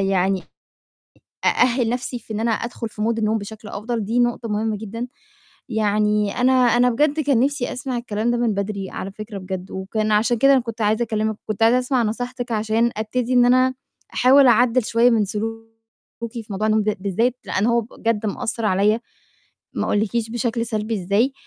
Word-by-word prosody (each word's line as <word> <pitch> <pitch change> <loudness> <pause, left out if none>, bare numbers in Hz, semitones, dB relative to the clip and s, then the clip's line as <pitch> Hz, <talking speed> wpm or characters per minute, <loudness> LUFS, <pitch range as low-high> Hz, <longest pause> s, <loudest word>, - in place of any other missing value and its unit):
يعني 195 -1 +1 1.0
أأهِّل 245 -1 +3
نَفْسي 245 +1 -2
في 225 - -10
إن 210 - -3
أنا 230 +1 +1
أدخُل 235 0 -4
في 210 0 -7
mood 230 +1 0
النوم 220 0 +1
بشكل 215 +1 -9
أفضل، 220 +2 -3
دي 230 +4 -1
نقطة 240 -1 0
مهمة 215 +1 -1
جدًا. 230 +4 -6 0.6
يعني 210 -1 +1
أنا 255 +1 +4
أنا 245 -1 +4
بجد 295 +5 +1
كان 275 -5 +2
نِفْسي 275 -1 0
أسمع 255 -1 -3
الكلام 225 0 -2
ده 240 - +1
من 235 -3 +1
بدري 200 -1 -3
على 195 - -5
فكرة 215 -1 -7
بجد 185 0 -6
وكان 215 +3 -2
عشان 225 +3 +2
كده 275 +3 +5
أنا 265 - +5
كنت 230 -1 -7
عايزة 215 +3 +2
أكلِّمِك، 220 -1 -1
كنت 215 +1 -3
عايزة 235 +3 +5
أسمع 250 -1 +1
نصيحتِك 245 +2 -3
عشان 220 +2 +1
أبتدي 230 +3 -2
إن 245 -1 +5
أنا 255 +1 +4 0.4
أحاول 270 +2 +6
أعدِّل 245 0 +4
شوية 235 +2 +3
من 220 -3 +3
سلوكي 225 +3 -5 0.7
في - - -19
موضوع 205 +2 -1
النوم 215 0 +3
ده 210 0 -1
بالذات، 225 +6 0
لإن 195 +4 0
هو 235 0 +3
بجد 225 -1 -2
مأثّر 230 +2 -3
عليّا، 210 +3 +2 0.7
ما - - -1
أقولِّكيش 220 +2 0
بشكل 235 0 -1
سلبي 220 0 -2
إزاي. 210 +9 +2
225 Hz, 180 wpm, -21 LUFS, 210-245 Hz, 1.0 s, أحاول